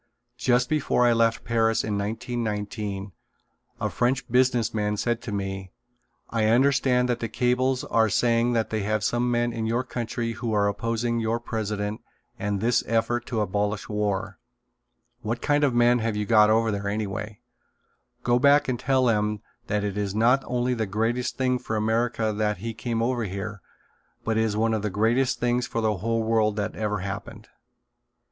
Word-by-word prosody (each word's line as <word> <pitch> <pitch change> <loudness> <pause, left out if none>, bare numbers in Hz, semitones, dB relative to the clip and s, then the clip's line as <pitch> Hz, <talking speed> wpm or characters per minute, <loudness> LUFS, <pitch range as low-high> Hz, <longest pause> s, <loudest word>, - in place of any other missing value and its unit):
Just 125 +1 +2
before 145 -4 +2
I 120 - +5
left 115 0 +2
Paris 115 -1 +1
in 105 -1 -2
1919 105 -2 -3 0.7
a - - 0
French 125 +1 0
business 125 -2 +2
man 105 -1 -1
said 120 +2 -1
to 110 - -6
me: 95 -1 -4 0.6
"I 115 -2 +1
understand 125 +1 +3
that 120 -1 -1
the 115 - -3
cables 125 +2 +1
are 110 -1 +2
saying 120 +3 +2
that 115 -1 -1
you 110 - 0
have 105 +1 -1
some 120 +2 +1
men 120 0 +1
in 110 -1 -2
your 120 +3 0
country 120 -1 -3
who 115 0 -3
are 100 -1 +3
opposing 115 +3 -1
your 115 +1 0
president 105 -2 -3 0.4
and 100 -1 -1
this 120 +4 +2
effort 115 +1 0
to 115 -3 -1
abolish 105 +1 -1
war. 105 -2 -2 0.8
What 115 +2 -2
kind 145 +3 +1
of 135 -4 +2
men 120 +1 +4
have 110 -1 -1
you 105 0 -1
got 105 -1 +5
over 110 0 +3
there, 100 0 -3
anyway? 105 0 -3 0.8
Go 120 0 +3
back 140 +2 +5
and 125 -2 -1
tell 130 0 +2
them 105 -2 +1 0.2
that 105 -1 0
it 105 0 -2
is 100 -1 -2
not 125 +5 +3
only 125 0 0
the 110 -3 -2
greatest 115 +5 -1
thing 125 -1 +1
for 110 - -4
America 110 0 0
that 105 -1 0
he 115 +5 -5
came 115 0 -2
over 120 -1 0
here 100 +1 -5 0.6
but 115 - 0
it 110 - +2
is 105 -1 -1
one 115 +1 +2
of 110 - 0
the 105 - -1
greatest 115 +6 +1
things 120 0 +1
for 115 - -3
the 110 -2 +1
whole 115 +4 -1
world 110 -2 +2
that 105 0 -3
ever 105 -2 -2
happened." 100 +1 -7
115 Hz, 180 wpm, -25 LUFS, 105-120 Hz, 0.8 s, I